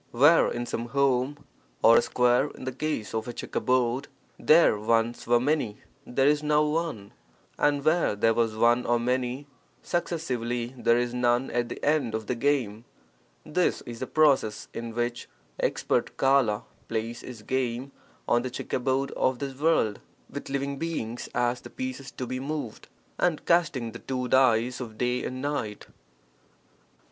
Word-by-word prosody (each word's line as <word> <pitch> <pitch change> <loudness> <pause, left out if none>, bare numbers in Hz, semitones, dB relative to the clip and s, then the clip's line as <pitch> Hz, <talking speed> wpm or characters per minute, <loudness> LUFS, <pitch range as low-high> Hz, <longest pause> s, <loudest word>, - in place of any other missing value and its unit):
Where 145 +7 +5
in 120 0 -3
some 120 0 -4
home 135 +2 0 0.4
(or, 115 - +8
a - - +6
square 125 +3 +2
in - - -10
the 130 - -3
case 130 -5 -3
of 110 +1 -2
a 120 - -4
checkerboard) 125 +2 0 0.3
there 155 -9 +5
once 115 +2 0
were 120 0 +4
many, 130 -5 0 0.3
there 135 +2 +1
is 150 0 +3
now 150 0 +3
one, 150 -10 -2 0.5
and 145 -1 +2
where 160 -8 +3
there 115 +2 +3
was 115 -1 0
one 120 +2 +3
or 120 0 +3
many 125 +3 -1 0.4
successively, 125 -9 -2
there 120 -1 +3
is 120 0 -1
none 125 +1 +1
at 120 -1 -1
the - - -6
end 145 -7 +1
(of 110 0 -4
the 125 - -1
game) 120 -4 0 0.3
— - - -37
this 180 - +2
is 120 -1 -8
the 130 - -4
process 140 -8 +2
in 115 -1 -6
which 120 0 -2 0.3
expert - - 0
Kala 130 -5 +3 0.2
plays 115 +1 -3
(his 120 -4 -10
game) 130 +2 -2 0.4
on 120 - +3
the 130 - -3
checkerboard 130 +2 -1
of 130 -1 0
this 135 0 -5
world 140 -8 +1 0.3
with - - -7
living 140 0 -2
beings 125 -8 -4
as 120 0 +1
the - - -10
pieces 130 +1 -5
to 130 - -6
be 130 +1 -4
moved, 140 -4 -5 0.3
and 170 -4 +1
casting 155 -9 +2
the 115 - -9
two 125 -1 -3
dice 125 -1 +3
of 115 -4 -7
day 125 +1 0
and 130 +1 -5
night. 135 -8 -3
125 Hz, 165 wpm, -27 LUFS, 115-140 Hz, 0.5 s, or